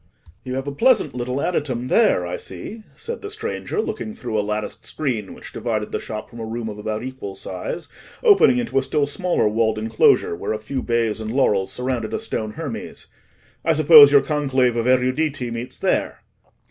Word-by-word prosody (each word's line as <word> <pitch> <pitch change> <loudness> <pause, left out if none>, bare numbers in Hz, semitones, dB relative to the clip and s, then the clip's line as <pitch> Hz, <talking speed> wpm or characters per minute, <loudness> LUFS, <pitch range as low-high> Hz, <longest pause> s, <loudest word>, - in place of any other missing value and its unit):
"You 130 -1 -4
have 135 0 -3
a 140 - -3
pleasant 245 - +3
little 125 +2 -3
adytum 140 -7 -1
there, 210 - +3
I 90 +1 -3
see," 145 - -7
said 470 0 -6
the 415 - -6
stranger, 430 0 -4
looking 220 - -3
through 120 -3 -5
a 105 - +3
latticed 105 +1 -4
screen 120 -10 -3
which - - -12
divided 110 -3 -2
the - - -2
shop 110 -1 -6
from 115 - -12
a - - -4
room 115 0 -4
of 105 0 -8
about 110 +1 -3
equal 130 -7 -6
size, 95 - -5 0.4
opening 410 - +6
into 235 - 0
a - - 0
still 145 +2 0
smaller 175 - 0
walled 110 +1 +1
enclosure, 110 -5 +3
where 100 - -3
a - - -2
few 120 +5 -4
bays 115 -2 0
and 110 - -4
laurels 105 -6 +1
surrounded 125 -3 -2
a - - 0
stone 110 - -4
Hermes. - - -6 0.6
"I 165 - +3
suppose 150 -2 +9
your 140 -1 +7
conclave 135 -5 +1
of 115 +1 0
eruditi 130 +1 +1
meets 115 +2 -5
there?" - - -1
125 Hz, 190 wpm, -22 LUFS, 110-150 Hz, 0.6 s, suppose